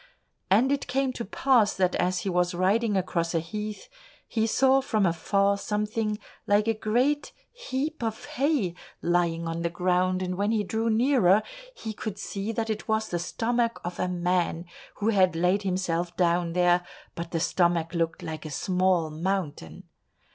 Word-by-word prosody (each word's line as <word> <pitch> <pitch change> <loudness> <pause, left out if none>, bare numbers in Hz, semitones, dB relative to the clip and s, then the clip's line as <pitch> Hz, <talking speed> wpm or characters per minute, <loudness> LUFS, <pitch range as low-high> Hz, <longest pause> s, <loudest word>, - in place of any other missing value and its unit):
And 230 +8 +4
it 280 0 -1
came 270 0 0
to 235 - -4
pass 230 0 +2
that 185 -1 +1
as 180 0 0
he 195 - -2
was 180 0 +1
riding 200 +4 +2
across 170 -2 -1
a - - +3
heath, 210 +5 -6 0.4
he 225 -1 0
saw 265 +3 +4
from 215 -6 +1
afar 200 +3 +1
something 210 +1 -1 0.3
like 205 +2 +3
a 225 - +3
great 245 +7 0 0.2
heap 315 - -4
of 220 -1 -3
hay 270 - 0 0.3
lying 170 -1 +1
on 165 0 -3
the 170 - 0
ground, 185 +1 +1
and 180 0 -3
when 205 +1 +1
he 220 -2 +1
drew 225 +3 -1
nearer, 220 -4 +4 0.3
he 220 - -6
could 205 -1 -5
see 200 +2 -4
that 225 -1 -2
it 215 - -5
was 220 0 0
the 175 - -1
stomach 235 +6 -1
of 175 0 -5
a 185 - +1
man, 180 -1 0 0.3
who 210 +2 0
had 185 -5 +3
laid 180 +4 +2
himself 175 -3 -2
down 170 -1 +2
there, 175 0 +3 0.3
but 170 0 -6
the 165 - -1
stomach 170 -1 +1
looked 165 -1 -1
like 160 -1 -5
a 155 - -6
small 180 +1 +1
mountain. 160 - -3
190 Hz, 170 wpm, -27 LUFS, 175-220 Hz, 0.4 s, And